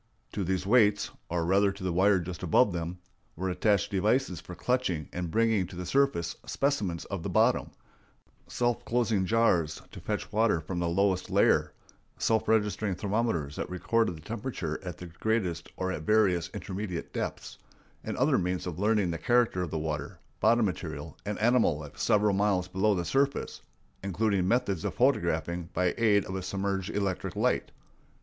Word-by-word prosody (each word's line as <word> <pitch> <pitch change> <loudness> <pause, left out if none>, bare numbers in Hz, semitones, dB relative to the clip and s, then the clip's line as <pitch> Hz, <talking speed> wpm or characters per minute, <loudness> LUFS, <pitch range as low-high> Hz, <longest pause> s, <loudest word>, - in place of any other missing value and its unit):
To 100 - -2
these 95 +1 -1
weights 105 -2 +3 0.2
(or 85 -1 -1
rather 100 +3 +3
to 100 0 -10
the 90 -2 -1
wire 95 +3 +4
just 85 -1 -6
above 90 +4 +3
them) 85 +1 -4 0.4
were 95 +2 -2
attached 100 +1 +1
devices 100 - +1
for 90 - -9
clutching 95 - -1
and 90 -1 -3
bringing 110 -1 +2
to 90 - -11
the 90 +1 -5
surface 135 -10 +1
specimens 105 - -1
of 100 -3 -5
the - - -4
bottom, - - +2 0.8
self 120 -1 -1
closing 115 -5 +1
jars 90 -9 +2
to - - -9
fetch - - -4
water 110 -5 +2
from 85 +3 -4
the 85 -1 0
lowest 95 +1 +1
layer, - - +3 0.4
self 110 -1 +1
registering 105 -2 +1
thermometers 100 -8 -1
that - - -3
recorded 90 +1 0
the - - -13
temperatures 105 - -4
at 90 -4 -6
the 90 - -8
greatest 90 -1 -2
or 95 0 -1
at 85 - -4
various 90 -3 +2
intermediate 95 -2 -5
depths, - - -5 0.4
and - - -4
other - - +3
means 90 0 -2
of 90 -2 -5
learning 105 -3 +2
the 85 - -4
character 120 -6 +2
of 90 - -2
the 80 - -3
water, 75 -2 -4 0.2
bottom 115 +2 +4
material, 80 -4 -5
and 105 - -2
animal 115 -8 +3
life 75 -2 -10
several 105 -1 +3
miles 95 -2 +1
below 100 +3 +1
the 90 -2 -2
surface, 135 +8 0 0.4
including 100 -1 0
methods 100 -6 +1
of - - -3
photographing 85 0 +1
by 90 0 +2
aid 105 -3 +4
of 95 - -6
a 95 - -2
submerged 95 +1 -2
electric 100 -3 -2
light. - - +1
95 Hz, 170 wpm, -29 LUFS, 85-110 Hz, 0.8 s, wire